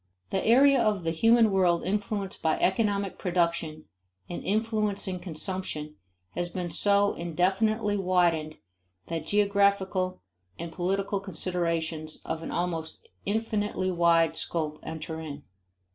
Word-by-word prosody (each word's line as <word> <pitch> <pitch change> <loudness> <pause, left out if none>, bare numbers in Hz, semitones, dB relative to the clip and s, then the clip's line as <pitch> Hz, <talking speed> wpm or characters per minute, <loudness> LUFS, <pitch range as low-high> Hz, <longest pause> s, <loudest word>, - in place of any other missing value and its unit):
The 190 - 0
area 270 +3 +6
of 210 -5 +1
the 165 - 0
human 225 +5 +4
world 180 -3 +3
influenced 200 0 -2
by 160 -1 +2
economic 200 0 +1
production 170 -4 -1 0.4
and 175 - -6
influencing 210 -3 -1
consumption 170 -3 -4 0.4
has 175 0 -2
been 175 -1 -4
so 200 +4 +3
indefinitely 200 +5 0
widened 175 -5 +1 0.5
that 165 -2 -3
geographical 200 - +1 0.3
and 170 0 -6
political 195 +3 -1
considerations 165 -4 -3
of 165 - -3
an - - -6
almost 165 -2 -3 0.2
infinitely 210 -3 -1
wide 170 -2 +3
scope 155 -2 -2
enter 160 0 -6
in. 145 -2 -7
185 Hz, 115 wpm, -28 LUFS, 165-200 Hz, 0.5 s, area